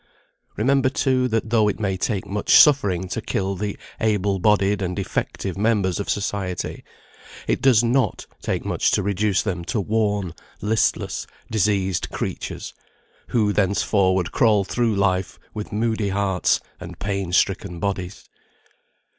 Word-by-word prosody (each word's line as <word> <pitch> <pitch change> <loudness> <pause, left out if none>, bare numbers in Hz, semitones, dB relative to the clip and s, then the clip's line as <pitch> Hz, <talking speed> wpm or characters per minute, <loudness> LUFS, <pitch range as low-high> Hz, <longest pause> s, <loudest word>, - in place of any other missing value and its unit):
Remember, 130 +4 +3
too, 130 -2 +1
that 110 -2 -1
though 110 -3 +4
it 105 - -1
may 100 -3 0
take 100 -1 -2
much 100 +1 +1
suffering 100 - +5
to 115 - -3
kill 100 -2 -2
the 100 +1 -4 0.2
able 105 -3 +1
bodied 100 0 +2
and 90 -1 -2
effective 95 0 -3
members 105 -4 +1
of 100 - -4
society, 100 -3 -3 0.6
it - - 0
does 125 -4 +5
not 125 +2 +1 0.2
take - - -2
much - - +1
to - - +2
reduce 100 0 +1
them 90 -5 -3
to 120 +2 -1
worn, 105 -3 0 0.3
listless, 110 +2 0 0.2
diseased 100 -4 +1
creatures, - - -5 0.5
who 105 -4 +1
thenceforward 95 -2 +1
crawl 110 -5 +3
through 115 +2 0
life 95 -2 0 0.2
with 105 -1 -6
moody 110 -1 0
hearts 95 -3 +1 0.2
and - - -9
pain 100 -2 -3
stricken 90 -1 +1
bodies. 95 0 -4
100 Hz, 140 wpm, -22 LUFS, 95-110 Hz, 0.6 s, suffering